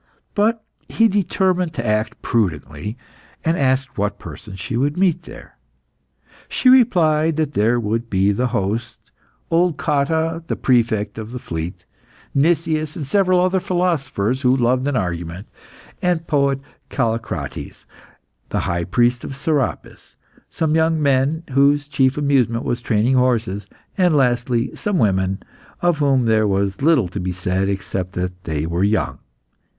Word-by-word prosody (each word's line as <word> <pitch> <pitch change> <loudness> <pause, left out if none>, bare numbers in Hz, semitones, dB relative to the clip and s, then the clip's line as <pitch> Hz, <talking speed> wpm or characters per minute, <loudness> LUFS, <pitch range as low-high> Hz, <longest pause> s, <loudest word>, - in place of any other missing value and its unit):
But 220 +2 +1 0.3
he 225 - +4
determined 185 -4 0
to 120 - -3
act 110 +1 -1
prudently, 95 - -2 0.5
and 165 +1 +2
asked 135 - 0
what 105 0 -1
persons 95 -2 -10
she 115 +5 -4
would 145 +6 0
meet 180 -3 +2
there. - - -13 0.9
She 255 - +3
replied 165 -11 +4
that 155 -2 -1
there 115 +2 +2
would 115 +1 -2
be 95 +1 +2
the 125 +5 0
host, 115 0 -3 0.4
old 170 -1 +2
Cotta, 160 +3 0
the - - -1
Prefect 110 -4 +1
of 110 +1 -7
the 125 - -5
Fleet, 80 -6 -6 0.5
Nicias, 155 0 +1
and 155 - -4
several 185 +4 +3
other 185 +1 +2
philosophers 135 - -1
who 130 0 +3
loved 125 +2 +1
an 145 - 0
argument, 90 -2 -3 0.6
the 180 -2 +2
poet 140 -3 +1 0.3
Callicrates, 110 - -3 0.6
the - - -1
high 85 -1 -1
priest 120 +6 +1
of 135 - -6
Serapis, 140 -1 -3 0.3
some 160 -2 -1
young 160 0 +2
men 140 +3 +1
whose 140 +2 +3
chief 135 -1 +1
amusement 130 -5 +1
was 120 0 -1
training 115 +2 +1
horses, 115 -6 0 0.3
and 180 -4 +4
lastly 120 -2 +1
some 205 -3 -1
women, 95 - +1 0.4
of 175 -3 +2
whom 135 -4 +3
there 110 -1 +3
was 100 +1 -1
little 145 - +4
to 95 +3 -6
be 90 0 -2
said 90 +2 -1
except 95 -1 -3
that 90 0 -4
they 80 -2 -2
were 85 +3 -1
young. 105 +2 0
130 Hz, 145 wpm, -20 LUFS, 105-155 Hz, 0.9 s, he